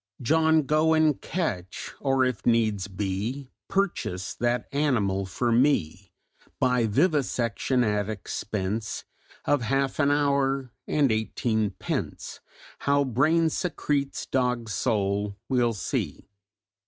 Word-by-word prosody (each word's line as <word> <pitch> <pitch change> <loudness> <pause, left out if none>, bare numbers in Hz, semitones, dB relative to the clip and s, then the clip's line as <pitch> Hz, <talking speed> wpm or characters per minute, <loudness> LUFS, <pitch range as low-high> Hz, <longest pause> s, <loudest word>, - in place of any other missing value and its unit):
"'John 160 +4 +3
go 155 +3 +3
and 155 -3 +3
catch 100 - -3
or, 135 -2 +2
if 125 -6 -2
needs 110 -5 +2
be 105 +7 -3 0.2
Purchase 170 - -1
that 120 0 -1
animal 110 -10 +1
for 120 +6 -1
me! 105 - +1 0.5
By 125 -3 +2
vivisection, 130 - +1
at 105 -2 0
expense 105 0 -3 0.4
Of 145 -2 +2
half 135 +4 0
an 140 -2 +4
hour 140 -3 +1 0.2
and 145 -5 +2
eighteen 110 -1 0
pence - - -4 0.4
How 140 0 +2
brain 155 +6 +2
secretes 145 -6 -1
dog's 125 -4 -1
soul, 100 0 0
we'll 120 -3 +2
see!'" 105 - -3
125 Hz, 110 wpm, -26 LUFS, 105-140 Hz, 0.5 s, an